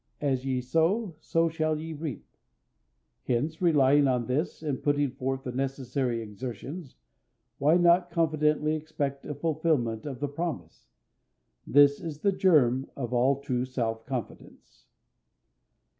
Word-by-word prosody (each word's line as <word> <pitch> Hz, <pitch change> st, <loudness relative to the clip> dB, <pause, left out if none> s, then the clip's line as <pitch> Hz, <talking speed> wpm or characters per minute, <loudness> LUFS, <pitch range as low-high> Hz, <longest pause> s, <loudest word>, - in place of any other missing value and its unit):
"As 135 Hz, -3 st, 0 dB
ye 130 Hz, -2 st, -1 dB
sow, 165 Hz, -, +1 dB
so 165 Hz, +1 st, +1 dB
shall 155 Hz, -1 st, -1 dB
ye 160 Hz, +1 st, -6 dB
reap." 150 Hz, -3 st, -6 dB, 1.0 s
Hence, 150 Hz, +7 st, -1 dB
relying 145 Hz, -4 st, +4 dB
on 125 Hz, -2 st, +1 dB
this, 145 Hz, +6 st, -2 dB
and 145 Hz, -4 st, -2 dB
putting 145 Hz, -2 st, +1 dB
forth 135 Hz, 0 st, -3 dB
the 125 Hz, -, -4 dB
necessary 130 Hz, -2 st, -2 dB
exertions, 125 Hz, -, -7 dB, 0.6 s
why 150 Hz, +5 st, +4 dB
not 175 Hz, 0 st, +4 dB
confidently 155 Hz, -2 st, +1 dB
expect 145 Hz, -3 st, -4 dB
a 150 Hz, -, -4 dB
fulfillment 145 Hz, -7 st, 0 dB
of 135 Hz, -4 st, -6 dB
the 145 Hz, -, -1 dB
promise? 145 Hz, -, -5 dB, 0.8 s
This 145 Hz, 0 st, +5 dB
is 155 Hz, -3 st, -6 dB
the 200 Hz, -, +3 dB
germ 140 Hz, -9 st, +3 dB
of 125 Hz, -3 st, -4 dB
all 130 Hz, +3 st, +2 dB
true 125 Hz, -3 st, -1 dB
self 115 Hz, -3 st, -3 dB
reliance. 130 Hz, -4 st, -7 dB
140 Hz, 130 wpm, -28 LUFS, 130-155 Hz, 1.0 s, This